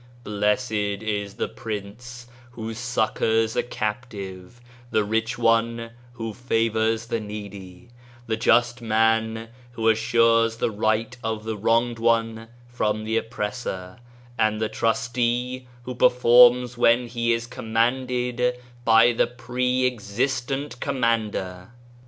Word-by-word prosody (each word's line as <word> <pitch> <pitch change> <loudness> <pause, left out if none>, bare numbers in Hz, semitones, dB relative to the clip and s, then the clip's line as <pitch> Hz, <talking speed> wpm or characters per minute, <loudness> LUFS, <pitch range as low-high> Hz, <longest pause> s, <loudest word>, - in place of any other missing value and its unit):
^ - - -25
Blessed 105 +3 0
is 105 -1 -2
the - - -2
prince 115 +3 -7 0.3
who 115 -1 -5
succours 115 -1 0
a - - +2
captive, 105 -3 -5 0.3
the 110 - +2
rich 110 +4 -1
one 115 0 +1 0.2
who 115 -2 -5
favours 115 -1 0
the 115 - -2
needy, 100 -2 -9 0.4
the 115 -2 -1
just 120 +2 +2
man 110 0 +1 0.2
who 115 -1 -1
assures 115 0 +3
the 115 - 0
right 110 +3 0
of 110 -1 -3
the 110 0 -3
wronged 115 +3 +1
one 115 -1 +1 0.2
from 110 -3 -1
the 110 +1 -2
oppressor, 105 -3 -4 0.4
and 110 0 +2
the 110 -1 -1
trustee 120 +2 -1 0.2
who 125 - -5
performs 125 0 +5
what 115 -1 +6
he 120 -1 -1
is 115 0 0
commanded 125 +1 0 0.3
by 115 +1 +6
the - - +2
Pre 125 +1 -1
existent 125 +4 -2
Commander." 115 -7 -2
115 Hz, 120 wpm, -24 LUFS, 110-120 Hz, 0.4 s, what